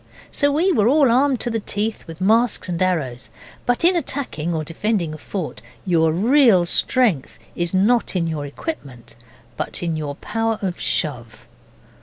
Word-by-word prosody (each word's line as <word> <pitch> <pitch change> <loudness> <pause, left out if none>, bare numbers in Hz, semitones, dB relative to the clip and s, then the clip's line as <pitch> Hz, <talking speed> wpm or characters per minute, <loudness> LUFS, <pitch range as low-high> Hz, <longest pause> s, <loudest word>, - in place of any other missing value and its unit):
So 285 0 +1
we 335 +7 +2
were 220 - +3
all 275 -1 +4
armed 260 +1 +3
to 240 - 0
the 225 - -1
teeth 210 0 -3
with 165 0 -10
masks 225 +4 +2
and 175 -1 -3
arrows, 150 -10 -1 0.4
but 245 +4 +1
in 360 +1 +5
attacking 260 - -2
or 160 -2 -2
defending 170 +1 -2
a - - -7
fort 160 - -5 0.2
your 165 -3 +3
real 220 - +4
strength 195 - +1 0.2
is 175 -1 -1
not 215 +3 +2
in 175 -2 +1
your 155 -3 -3
equipment, 140 - -7 0.4
but - - -4
in 165 -2 -1
your 150 -2 -4
power 225 +5 -2
of 180 -2 -3
Shove. 120 -7 -3
185 Hz, 165 wpm, -21 LUFS, 160-240 Hz, 0.4 s, in